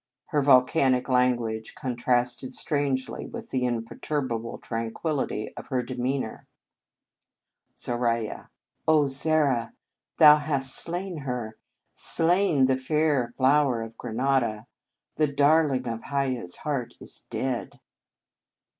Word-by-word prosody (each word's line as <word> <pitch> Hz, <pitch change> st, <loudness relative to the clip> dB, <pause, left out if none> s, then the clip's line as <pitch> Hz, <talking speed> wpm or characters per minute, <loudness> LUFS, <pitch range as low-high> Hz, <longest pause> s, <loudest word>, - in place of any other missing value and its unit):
Her 150 Hz, -, +1 dB
volcanic 130 Hz, -1 st, +4 dB
language 120 Hz, -3 st, 0 dB
contrasted 125 Hz, -1 st, -1 dB
strangely 140 Hz, -3 st, -2 dB
with 230 Hz, -1 st, -9 dB
the 130 Hz, -, 0 dB
imper 115 Hz, -2 st, -4 dB
turbable 120 Hz, -6 st, -2 dB
tranquillity 115 Hz, +1 st, -3 dB
of -, -, -9 dB
her 130 Hz, -3 st, -1 dB
demean 130 Hz, +2 st, -2 dB
our. 110 Hz, -, -9 dB, 1.3 s
Zoralya. 115 Hz, -2 st, -2 dB, 0.4 s
Oh! 155 Hz, -2 st, +5 dB
Zara, 140 Hz, -4 st, +1 dB, 0.4 s
thou 150 Hz, -1 st, +9 dB
hast 140 Hz, -3 st, 0 dB
slain 175 Hz, +1 st, -1 dB
her, 125 Hz, -6 st, -5 dB, 0.3 s
slain 165 Hz, -4 st, +2 dB
the 130 Hz, 0 st, +2 dB
fair 140 Hz, -2 st, +1 dB
flower 135 Hz, -3 st, +3 dB
of 115 Hz, 0 st, -9 dB
Granada. 120 Hz, -2 st, -1 dB, 0.5 s
The 155 Hz, -, +3 dB
darling 140 Hz, -2 st, +3 dB
of 115 Hz, -1 st, -3 dB
Hiaya 135 Hz, -5 st, -1 dB
s 90 Hz, -, -7 dB
heart 130 Hz, -6 st, -3 dB
is -, -, -9 dB
dead. 130 Hz, -2 st, -3 dB
130 Hz, 110 wpm, -26 LUFS, 120-145 Hz, 1.3 s, thou